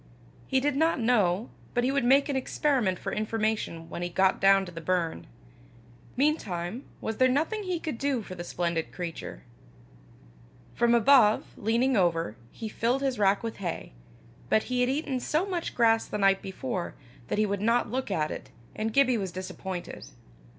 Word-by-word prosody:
He 265 - +2
did 285 +1 0
not 320 0 +2
know, 220 -3 +2 0.2
but 245 - +2
he 260 - +2
would 280 -1 +1
make 270 +4 +5
an 285 - -2
experiment 260 -7 +1
for - - -5
information 215 -6 -2
when 170 - -6
he 175 - -2
got 190 +2 +2
down 195 0 +5
to 180 - -9
the 165 -1 -8
burn. 170 -1 -1 0.9
Meantime 230 - -1 0.2
was 220 -1 -3
there 255 - +5
nothing 315 - 0
he 365 -4 -2
could 310 -8 -5
do 275 -5 0
for 185 - -8
the 175 -1 -6
splendid 170 -2 -2
creature? 170 -3 -6 1.3
From 235 0 +3
above, 235 -3 +5
leaning 235 +5 +1
over, 165 - +1 0.2
he 225 - -6
filled 240 +5 0
his 265 -5 -1
rack 200 +1 +3
with 225 -1 -4
hay; 180 -4 -4 0.6
but 220 - +3
he 250 - +2
had 250 - +2
eaten 270 -1 -1
so 310 +8 0
much 360 -4 -3
grass 225 -1 +3
the - - -3
night 195 -1 +3
before, 190 0 -4 0.3
that - - -2
he 215 - +3
would 200 -1 -2
not 230 +1 +2
look 260 -1 -2
at 155 -6 0
it, - - -7 0.3
and 220 0 -2
Gibbie 260 -4 +4
was 190 -3 -3
disappointed. 185 0 -6
225 Hz, 180 wpm, -28 LUFS, 190-265 Hz, 1.3 s, make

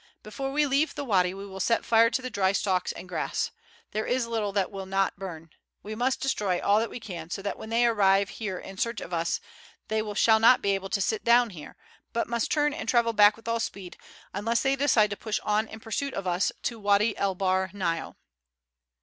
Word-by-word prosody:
Before 270 +6 -5
we 295 +2 +2
leave 280 +3 +1
the - - -4
wady 185 -6 +2
we 195 +1 -7
will 190 -1 -9
set 230 +4 +1
fire 230 0 +5
to 250 +2 -2
the 255 - -4
dry 195 -3 +1
stalks 190 -3 0
and - - -9
grass. 170 -4 -2 0.4
There 215 +1 -2
is 250 -1 +1
little 225 -3 -2
that 195 -1 0
will 195 -1 -6
not 195 -1 0
burn. 165 -4 -8 0.3
We 215 - -6
must 245 +4 0
destroy 205 -9 0
all 205 +1 +3
that 225 - -1
we - - -7
can, 175 -7 -8
so 195 +2 -5
that 200 - -2
when 220 - -9
they 235 +1 +3
arrive 200 -3 +3
here 200 -5 -4
in 195 +1 -9
search 235 -2 -1
of 175 - -8
us 170 0 0 0.5
they 220 0 +1
shall 220 +1 +5
not 235 +3 +6
be 200 - +2
able 195 0 -3
to 200 - 0
sit 215 +4 -1
down 235 -1 +4
here, 155 -5 -10 0.4
but 235 - 0
must 235 -1 -1
turn 295 -1 +2
and 225 - -5
travel 235 -1 +3
back 210 -1 +6
with 225 - -16
all 230 0 0
speed, 195 -5 -5 0.4
unless 230 +4 0
they 270 0 +2
decide 255 -7 +3
to - - -2
push 215 -1 -2
on 215 +1 +1
in 220 - -10
pursuit 245 +6 -3
of 195 - -4
us 180 +1 +1
to 230 -2 -3
Wady 205 +1 +2
El 195 -1 0
Bahr 190 0 +1
Nile." 175 -4 -3
210 Hz, 225 wpm, -27 LUFS, 195-230 Hz, 0.5 s, not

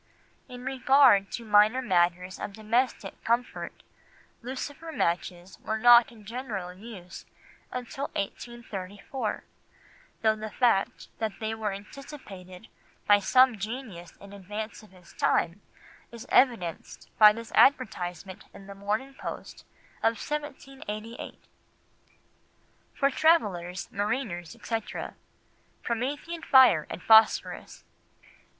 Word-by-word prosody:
In 250 0 -9
regard 265 -6 +4
to 235 - -5
minor 210 +3 +5
matters 180 -4 0
of 200 - -5
domestic 225 +4 -2
comfort, 235 +2 -2 0.6
lucifer 275 +6 -6
matches 175 - -2
were 220 +1 -2
not 240 0 +7
in 220 -3 -16
general 215 -6 -5
use 190 -2 -11 0.4
until 250 +3 -5
1834, 205 +1 -5 0.8
though 220 -1 +4
the 215 0 -6
fact 220 -4 +1
that 215 -3 -3
they 220 0 -2
were 220 -2 -3
anticipated 200 -3 -11 0.4
by 205 0 +6
some 255 +2 +4
genius 205 -6 -7
in 200 0 -13
advance 210 +4 -7
of 215 - -17
his 180 -2 -18
time 175 +5 0 0.5
is 235 -1 -10
evidenced 230 - +1
by 210 -1 +10
this 230 +1 -8
advertisement 190 -8 +1
in 195 - -12
the 200 - -9
Morning 210 +7 -3
Post 265 - -8 0.4
of 225 0 +2
1788— 270 -6 -6 1.6
"For 275 0 +2
Travellers, 200 - +1
Mariners, 205 -5 -3
etc., 225 -2 -5 0.7
Promethean 285 +8 -3
Fire 255 - +6
and - - -7
Phosphorus. 220 0 +3
220 Hz, 105 wpm, -27 LUFS, 195-255 Hz, 1.6 s, by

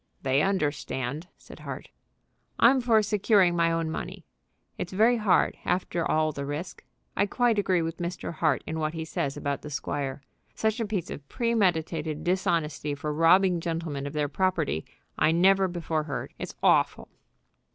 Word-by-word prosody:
"They 135 +1 +2
understand," 150 -4 -1
said - - -14
Hart. - - -7 0.7
"I'm 255 +2 +5
for 225 -3 +4
securing 200 -3 +3
my 170 -1 +2
own 165 -1 -1
money. - - -6 0.5
It's 180 - -5
very 225 +5 +4
hard, 210 -4 +2
after 175 -1 -1
all 155 0 +2
the 140 -1 -5
risk. 145 +5 -5 0.3
I 200 - +2
quite 235 0 +2
agree 185 -4 +2
with 165 +1 -4
Mr. 175 0 -4
Hart 155 -4 +1
in 160 0 -4
what 155 +1 -2
he 160 0 -4
says 140 -3 -3
about 140 -1 -2
the 150 - -8
squire. 140 -1 -4 0.3
Such 220 +2 0
a 225 - -1
piece 200 -5 -3
of 140 -1 -9
premeditated 165 -9 0
dishonesty 165 -5 0
for 150 +1 -3
robbing 175 +3 +4
gentlemen 165 -4 -3
of 140 - -7
their 150 -1 0
property 145 - 0 0.3
I 155 - +4
never 190 +3 +4
before 165 -3 -2
heard. 145 -3 -5
It's - - -6
awful." - - +3
165 Hz, 160 wpm, -27 LUFS, 150-190 Hz, 0.7 s, I'm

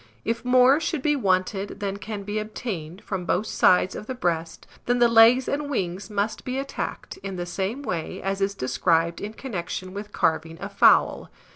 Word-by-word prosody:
If 230 +1 -1
more 255 +3 +5
should 310 -3 -2
be 295 -1 +3
wanted 195 -3 0
than 200 -1 -3
can 205 0 -6
be 205 +2 -2
obtained 200 -5 -6
from 190 -3 -4
both 180 +4 0
sides 185 -3 +3
of 210 - -7
the 260 - -4
breast, 170 -7 -2 0.2
then 245 0 +2
the 240 -1 +5
legs 230 +3 +6
and 285 0 -2
wings 190 -6 -3
must 210 +1 -2
be 255 +1 -3
attacked, 275 0 -5
in 195 -1 -6
the 175 -1 -4
same 195 +9 -3
way 170 - -4
as 195 +1 -3
is 200 +1 0
described 165 +5 +1
in 210 +1 -5
connection 185 -6 -5
with 205 +1 -7
carving 165 -2 0
a 200 - -5
fowl. 200 - +4
200 Hz, 185 wpm, -25 LUFS, 185-240 Hz, 0.2 s, legs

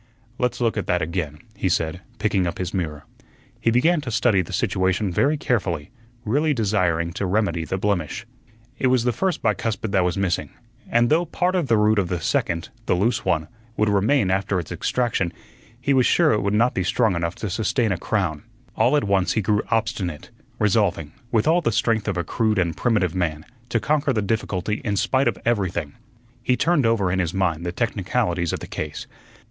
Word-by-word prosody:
"Let's 125 -1 0
look 115 -2 +1
at 105 - -2
that 90 -2 +1
again," 80 -3 -3 0.2
he 95 - -1
said, 85 0 -1 0.2
picking 100 -4 +1
up 85 - -4
his 90 -2 -4
mirror. 75 -6 -3 0.6
He - - +1
began 150 +8 +3
to 130 - -5
study 110 -3 +3
the 85 - -8
situation 95 +1 0
very 145 - +2
carefully, 95 - -1 0.3
really 145 +7 +1
desiring 90 -7 +1
to 95 +1 -2
remedy 90 -4 0
the 95 - -2
blemish. 100 +1 -1 0.5
It 130 - +2
was 125 -2 +3
the 125 - +2
first 190 +4 -1
bicuspid 110 0 -1
that 95 -2 +3
was 90 0 0
missing, 95 -3 0 0.4
and 120 0 +3
though 165 +3 +3
part 180 +3 0
of 175 -6 0
the 115 -2 +3
root 105 0 +3
of 95 - 0
the 90 -1 -2
second 85 +2 -1 0.2
(the - - +3
loose 110 +4 +1
one) 80 -2 0 0.3
would 105 0 +2
remain 100 +1 +2
after 95 0 0
its 85 - -7
extraction, 115 -8 0 0.5
he 140 +3 +1
was 130 -2 +4
sure 170 -3 +4
it 105 - +1
would 100 - 0
not 120 +4 +3
be 95 - -1
strong 110 +2 +2
enough 85 +1 -2
to 105 - -4
sustain 110 +3 0
a 95 - 0
crown. 90 -9 -1 0.3
All 140 +5 +3
at - - +1
once 100 -2 +1
he 110 - +1
grew 105 +2 +2
obstinate, 95 -8 -2 0.3
resolving, 95 -7 +1 0.2
with 115 +1 +2
all 170 +2 +4
the 115 - +1
strength 110 -1 +1
of - - -1
a 85 - 0
crude 110 +1 0
and 85 -3 +1
primitive 105 -8 +1
man, 80 -4 -2 0.2
to 115 - +1
conquer 145 +4 +1
the 110 -3 0
difficulty 105 -1 -2
in 105 -2 -1
spite 135 +7 +2
of - - 0
everything. 90 -10 0 0.5
He 125 +1 +1
turned 160 -8 +2
over 100 -5 +2
in 95 - 0
his 85 0 -1
mind 85 -4 0
the - - -1
technicalities 90 -4 -1
of - - -4
the - - -5
case. 75 -1 -5
100 Hz, 200 wpm, -23 LUFS, 90-115 Hz, 0.6 s, was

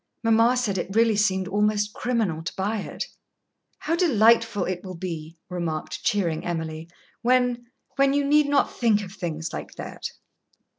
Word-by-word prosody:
Mamma 230 +2 +4
said 205 -6 0
it 195 +3 -4
really 225 -1 +4
seemed 190 -3 +1
almost 210 +1 +1
criminal 220 -10 -1
to 170 - -5
buy 205 +3 -1
it." - - -5 0.7
"How 330 - -1
delightful 230 - +4
it 180 -1 -3
will 185 -1 -7
be," 165 -2 -6
remarked 170 -4 -4
cheering 170 -6 0
Emily, 160 -1 -4 0.3
"when 245 -1 +2 0.3
when 275 0 +4
you 285 0 +2
need 295 +1 +4
not 285 -1 +2
think 215 -4 +2
of 185 - -8
things 165 -5 -4
like - - -6
that!" - - -8
210 Hz, 155 wpm, -25 LUFS, 180-235 Hz, 0.7 s, Mamma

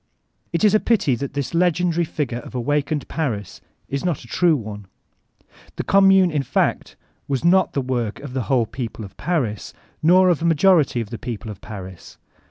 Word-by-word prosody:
It 170 +2 -1
b 210 - +7
a 215 - +5
pity 215 - +2
that 135 +3 -4
this 140 +2 -3
legendary 175 0 +2
figure 135 -6 -3
of 125 - -11
Awakened 145 +3 -1
Paris 115 - -4 0.3
is 140 0 -3
not 175 -7 -1
a - - -14
true 170 +5 +3
one. 105 -5 -7 0.9
The - - -3
Q)mmune, 195 -2 +5
in 150 -2 0
fact, 135 - -1 0.3
was 140 +2 -2
not 185 +2 +4
the 140 - 0
woric 120 -4 -2
of 140 -3 -7
the 130 -3 -2
whole 125 -4 +3
people 115 -2 -6
of 95 - -13
Paris, 130 - -2 0.3
nor 185 +3 +5
of 170 -3 +1
a - - -1
majority 165 -5 +3
of 110 -1 -7
the 115 - -6
people 115 -3 -6
of 100 - -11
Paris. 95 -4 -10
140 Hz, 185 wpm, -21 LUFS, 120-170 Hz, 0.9 s, b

